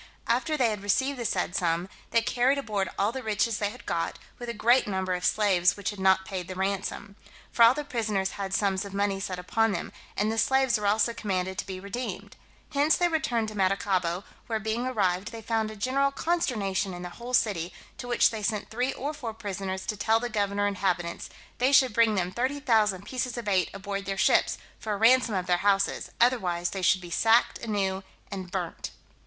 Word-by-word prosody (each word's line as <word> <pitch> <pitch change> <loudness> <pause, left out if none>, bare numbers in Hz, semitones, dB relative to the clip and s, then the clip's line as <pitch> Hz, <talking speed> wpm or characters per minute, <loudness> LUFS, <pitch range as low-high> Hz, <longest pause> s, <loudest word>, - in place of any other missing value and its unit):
After 310 -1 +1
they 245 -5 +3
had 210 -2 -4
received 260 +7 0
the 235 - -3
said 180 - -1
sum, 170 0 0 0.2
they 230 - +2
carried 250 +4 +2
aboard 210 -8 -2
all 200 +2 +2
the 260 +2 -5
riches 215 0 0
they 205 - 0
had 250 +4 -12
got, 165 0 -2 0.2
with 240 -1 -6
a - - 0
great 240 +4 +4
number 190 -2 -1
of 180 0 -3
slaves 185 -3 +3
which 205 0 -2
had 205 - -10
not 190 0 +3
paid 185 -2 -5
the 185 - -6
ransom; 195 +1 -3 0.4
for - - -1
all 230 +2 +8
the 295 - -3
prisoners 215 -8 -1
had 195 -1 -5
sums 195 -1 +1
of 200 -1 -8
money 200 -1 0
set 190 -2 -4
upon 220 +4 +1
them, - - -4 0.3
and 210 +2 +1
the 225 - -1
slaves 265 0 +3
were 205 - -1
also 220 +3 +2
commanded 190 -4 -2
to - - -4
be 190 -1 -5
redeemed. 200 +6 -6 0.4
Hence 290 +2 +3
they 350 -1 +2
returned 245 -9 0
to 215 - -9
Maracaibo, 185 -2 0 0.2
where 225 -1 -1
being 220 +3 -2
arrived, 195 -5 0
they 230 - -7
found 220 -1 0
a 215 - -8
general 260 +6 +1
consternation 215 - -1
in 175 - -7
the 180 - -6
whole 250 +1 -1
city, 180 -7 +1 0.3
to 245 - -6
which 240 -1 +4
they 220 -2 -5
sent 210 0 -2
three 250 +4 -1
or 290 +4 -4
four 240 -7 -6
prisoners 190 -3 -4
to 215 - -2
tell 220 +2 +2
the 245 +1 -3
governor 205 -2 0
and 200 -1 -1
inhabitants, 175 -3 -1 0.3
"they 255 +2 +3
should 265 -4 +5
bring 225 -1 +4
them 180 -2 -1
30,000 230 -6 +1
pieces 250 -1 -3
of 235 -3 -5
eight 185 -4 +2
aboard 195 0 -5
their 195 0 -3
ships, 195 - +3 0.2
for 215 - -3
a - - -2
ransom 230 0 +4
of 185 -1 -1
their 180 -1 +2
houses, 195 +1 +1
otherwise 180 -8 +2
they 195 - -4
should 185 +1 +3
be 175 -1 -9
sacked 225 +5 +3
anew 195 -4 -1 0.3
and 190 -2 -5
burnt." 175 -2 -4
205 Hz, 215 wpm, -27 LUFS, 190-235 Hz, 0.4 s, all